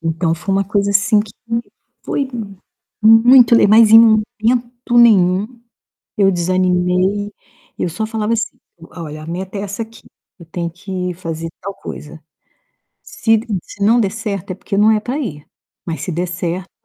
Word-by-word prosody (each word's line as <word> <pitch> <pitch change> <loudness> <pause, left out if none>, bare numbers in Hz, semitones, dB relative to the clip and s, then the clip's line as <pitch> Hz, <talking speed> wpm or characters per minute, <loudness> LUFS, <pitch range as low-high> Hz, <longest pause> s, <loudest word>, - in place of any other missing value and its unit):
Então 165 0 -1
foi 190 +3 -3
uma 195 0 +1
coisa 200 +1 0
assim 205 +1 +3
que 210 -1 -7 0.7
foi 275 -2 -2 0.7
muito 235 +2 +7
le 230 - +5
mas 215 +1 +6
em 225 - +9
momento 235 +2 +1
nenhum 215 0 +3 0.6
eu 195 -2 +4
desanimei. 185 +3 0 0.5
Eu - - -1
só 215 +7 -4
falava 220 0 -2
assim: 230 - -2 0.3
"Olha, 155 -3 -8
a 155 - -10
meta 185 +4 -5
é 195 - -4
essa 205 +3 -5
aqui, 225 +1 -12 0.4
eu 170 - -14
tenho 170 0 -4
que 180 +1 -5
fazer 165 -1 -6
tal 200 +1 -6
coisa. 155 +1 -10 0.8
Se 225 - -1
n 215 -4 -3
se 205 - -7
não 230 +4 +4
der 200 -4 0
certo, 205 -4 -5
é - - -5
porque 195 +1 -5
não 215 +2 +5
é 215 - +2
pra 250 +6 -4
ir, 150 - -6 0.4
mas 165 -2 -5
se 185 - -4
der 175 +2 -2
certo" 175 +1 -4
200 Hz, 165 wpm, -17 LUFS, 180-225 Hz, 0.8 s, em